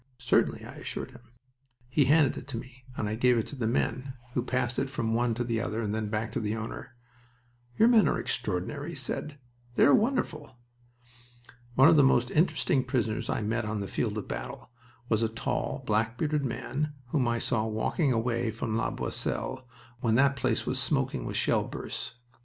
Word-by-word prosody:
"Certainly," 125 -1 +1
I - - -10
assured - - -5
him. - - -14 0.7
He 135 +3 +3
handed 145 0 +4
it 125 - -8
to 135 -5 -4
me, 125 +1 -10
and 105 - -1
I 105 - -2
gave 125 +2 +3
it 115 - 0
to - - -6
the 120 -5 -1
men, 130 +2 -1 0.2
who 125 - +1
passed 125 0 -1
it 135 - -1
from 115 -4 -1
one 120 0 +1
to 120 - -1
the 115 -2 -1
other 110 - -2
and 105 -2 -1
then 110 -1 -1
back 110 +1 -2
to 125 - -2
the 105 -1 -1
owner. 115 +2 -6 0.8
"Your 225 - +6
men 230 -3 +6
are - - +1
extraordinary," 125 - -2
he 170 - -6
said. 140 +2 -5 0.4
"They - - +6
are 140 - +6
wonderful." 210 - 0 1.2
One 135 +4 +7
of 165 -1 +6
the 145 - +7
most 125 -2 +3
interesting 150 -4 +2
prisoners 120 -4 -1
I - - 0
met 115 +3 0
on 105 0 -2
the 100 - -3
field - - -1
of - - -4
battle 60 - -6 0.4
was 110 -1 +2
a 115 - +2
tall, 115 +1 -2
black 115 +2 +1
bearded 150 -1 0
man 145 +4 -2 0.2
whom 130 -2 +1
I 120 0 +1
saw 110 -1 0
walking 110 +7 0
away 115 0 0
from 110 0 -3
La 115 - +1
Boisselle 130 -1 -3 0.3
when 115 -2 +2
that 135 +2 +4
place 130 -3 0
was - - 0
smoking - - 0
with - - -2
shell - - +2
bursts. - - -6
120 Hz, 200 wpm, -29 LUFS, 110-135 Hz, 1.2 s, One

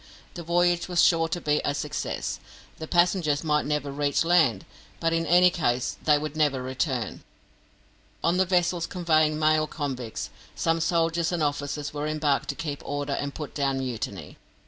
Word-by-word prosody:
The 175 - -7
voyage 175 +1 +1
was 175 -2 +3
sure 165 -1 +4
to 170 +2 -3
be 150 -2 +1
a 145 - 0
success; - - -3 0.4
the 160 - -6
passengers 175 -4 +2
might 150 -2 +1
never 145 -1 -1
reach 145 +2 0
land, 160 - +3 0.3
but 165 0 +1
in 165 0 0
any 180 +1 +6
case 125 -8 0
they 150 -1 +5
would 150 0 -5
never 145 -4 +1
return. 130 -3 -2 1.0
On 170 +2 +2
the 190 - +3
vessels 175 -2 +1
conveying 155 -3 +2
male 155 0 +2
convicts, 130 -7 -5 0.2
some 165 0 +1
soldiers 165 0 +1
and 170 -3 0
officers 145 0 -2
were 150 0 -3
embarked 150 -2 0
to 140 - -2
keep 145 0 -5
order 145 0 -3
and 140 0 -3
put 150 -2 -6
down 140 -2 0
mutiny. 125 -4 -5
155 Hz, 170 wpm, -26 LUFS, 145-170 Hz, 1.0 s, any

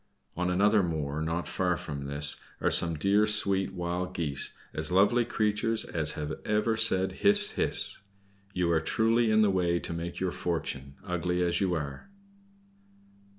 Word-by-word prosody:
On 90 +1 -1
another 100 +3 +3
moor, 80 -4 -3
not 80 +2 -3
far 90 -2 -1
from 70 -3 -7
this, 70 +1 +4 0.2
are - - 0
some 85 -1 +3
dear, 100 +6 +2
sweet 100 -2 +2
Wild 90 0 -4
Geese, 75 -5 0 0.2
as 75 +1 -2
lovely 100 +6 +3
creatures 110 0 0
as 80 -3 -1
have 75 0 -5
ever 105 +2 0
said 95 -4 +3
'Hiss, 205 0 +3
hiss.' - - +1 0.5
You 90 -3 0
are 80 -1 +2
truly 115 +4 +1
in 110 0 +4
the 100 - +3
way 90 -2 +1
to 85 - -5
make 85 +1 -6
your 95 -1 -1
fortune, 70 -6 -4
ugly 90 0 -1
as 85 +1 0
you 90 -3 +1
are." 75 - -6
90 Hz, 160 wpm, -28 LUFS, 80-105 Hz, 0.5 s, this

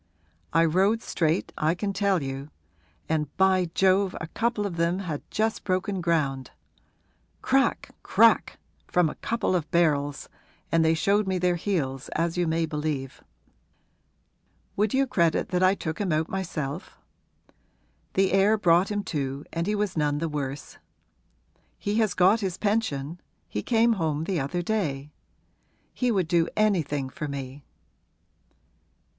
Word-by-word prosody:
I 165 - +4
rode 195 +7 +2
straight, 165 +1 0
I 155 +3 +2
can 200 +2 -2
tell 195 -5 +1
you; 135 +2 -5 0.6
and, 155 -1 0
by 190 -2 +3
Jove, 190 0 +3
a - - -4
couple 225 -1 -1
of 180 -4 -4
them 170 +2 +1
had 170 -7 -4
just 220 +1 -1
broken 185 0 -1
ground! 145 -6 0 0.9
Crack 270 +1 +1
crack, - - +3 0.3
from 175 -3 +2
a - - -15
couple 230 -5 0
of 165 -3 -2
barrels, 145 -5 +1 0.4
and 165 0 +3
they 160 0 +3
showed 200 +5 +2
me 190 -1 0
their 180 0 +2
heels, 145 -8 -2
as 165 +1 0
you 175 -1 0
may 165 +1 +1
believe. 150 -4 -4 1.5
Would 210 +1 +1
you 270 +1 +2
credit 170 -10 +1
that 180 0 0
I 185 +1 +4
took 160 -1 -4
him 195 -4 0
out 155 +1 +1
myself? 170 -5 -4 1.2
The 195 0 +3
air 195 +3 +4
brought 175 -1 +3
him 205 -1 -2
to 140 -3 -3
and 170 +2 -2
he 210 - +1
was 205 -2 -1
none 150 -2 +1
the 165 +2 -1
worse. 145 -2 -5 1.0
He 205 +2 -1
has 215 -5 +1
got 190 +5 +4
his 190 -5 -3
pension 175 -8 -1 0.3
he 105 - -3
came 230 - +3
home 160 -6 -1
the 175 0 -1
other 160 +6 -2
day; 150 -9 -2 0.8
he 250 - 0
would 190 -6 +1
do 170 -1 +2
anything 160 -10 +1
for 150 +3 -6
me.' 140 0 -6
175 Hz, 150 wpm, -26 LUFS, 150-195 Hz, 1.5 s, I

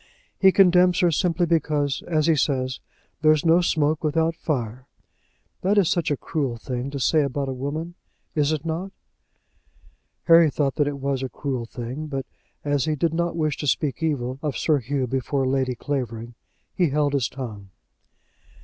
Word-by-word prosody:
He 190 -1 +6
condemns 180 -1 +5
her 175 -1 +4
simply 175 +2 +1
because, 150 -4 0
as 155 -3 +1
he 165 -1 +4
says, 130 -2 0 0.4
there 155 0 +6
is 155 +2 -1
no 165 +2 +5
smoke 155 -2 +1
without 160 +2 +1
fire. 130 -5 -3 0.7
That 200 +3 +2
is 195 -5 +4
such 170 -2 0
a 145 - 0
cruel 135 -7 -2
thing 125 +3 -4
to 140 0 -5
say 155 +4 +3
about 140 0 -2
a - - -2
woman; 150 +6 -4 0.4
is 150 -1 +1
it 155 0 -2
not?" 170 +4 -3 1.3
Harry 165 -1 +6
thought 140 -2 0
that 145 - +2
it 145 -1 -3
was 135 -1 -2
a 130 - -3
cruel 130 -5 -4
thing, 125 +7 -6
but 135 -3 -4 0.4
as 145 -3 +1
he 155 - 0
did 160 +2 0
not 170 0 -1
wish 155 -2 0
to 145 - -4
speak 140 -1 0
evil 135 -5 -1
of 150 -3 -2
Sir 155 -3 +2
Hugh 135 +2 -2
before 135 +2 -1
Lady 130 -1 0
Clavering, 120 -4 -4 0.4
he 180 -4 +2
held 145 0 +1
his 135 -5 +1
tongue. 110 -7 -7
145 Hz, 175 wpm, -24 LUFS, 130-160 Hz, 1.3 s, He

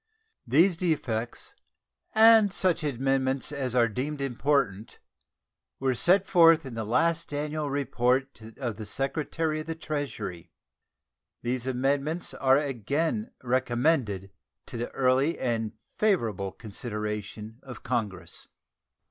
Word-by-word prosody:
These 165 +8 +4
defects 120 -10 -2 0.6
and 220 -2 +7
such 180 -3 +2
amendments 135 -1 0
as 130 -4 -3
are 120 -2 +5
deemed 140 +7 -3
important 135 -5 0 0.8
were 130 -1 +1
set 180 +10 +3
forth 165 -3 +5
in 130 - -7
the 115 -1 -3
last 150 +11 +1
annual 150 +1 -2
report 135 -2 0 0.2
of 120 -6 -4
the 110 - -6
Secretary 155 +5 -1
of 155 - -7
the 165 - -3
Treasury. 145 - -5 0.9
These 125 +1 -2
amendments 140 +6 0
are 130 0 +3
again 145 - -1
recommended 120 - 0 0.3
to - - -7
the 120 - -3
early 135 +5 +2
and 115 -4 -1 0.3
favorable 110 - +1
consideration 105 0 -6
of 125 -4 -10
Congress. 110 -6 -3
135 Hz, 115 wpm, -27 LUFS, 115-155 Hz, 0.9 s, and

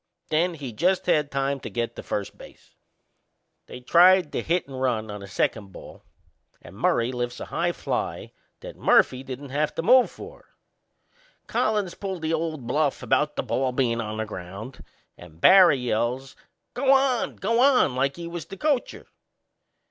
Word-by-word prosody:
Then 170 +3 +1
he 135 -6 -7
just 180 - +1
had 150 -2 +2
time 140 0 -1
to - - -7
get 120 -1 -3
to - - -7
first 100 -1 -4
base. - - -16 0.9
They 125 - -10
tried 175 +4 +5
the - - -2
hit 170 -1 -1
and 130 -2 -7
run 110 -5 -1
on 105 - -7
the 100 - -10
second 100 +1 -2
ball - - -12 0.6
and - - -14
Murray 115 +2 +1
lifts 120 -1 -4
a - - -6
high - - -1
fly - - -4 0.3
that - - -9
Murphy 130 - +3
didn't 135 +1 -8
have 150 +2 -1
to 165 - -3
move 250 +6 +5
for. - - -13 0.9
Collins 210 -5 -1
pulled 190 -4 -6
the 160 +1 -1
old 160 -5 -3
bluff 145 +2 0
about 150 +3 +1
the - - -2
ball 130 -1 -1
bein' 120 -3 0
on 110 -1 -5
the 110 - -2
ground 100 +5 -9 0.4
and 80 -2 -14
Barry 185 - +7
yells, 125 +2 -2 0.4
"Go 265 +2 +2
on! 265 -3 +2
Go 230 +4 0
on!" 255 - +4
like 135 +2 0
he 170 - -7
was 170 -2 -7
the 195 - -9
coacher. 295 -5 -1
140 Hz, 170 wpm, -25 LUFS, 120-180 Hz, 0.9 s, Barry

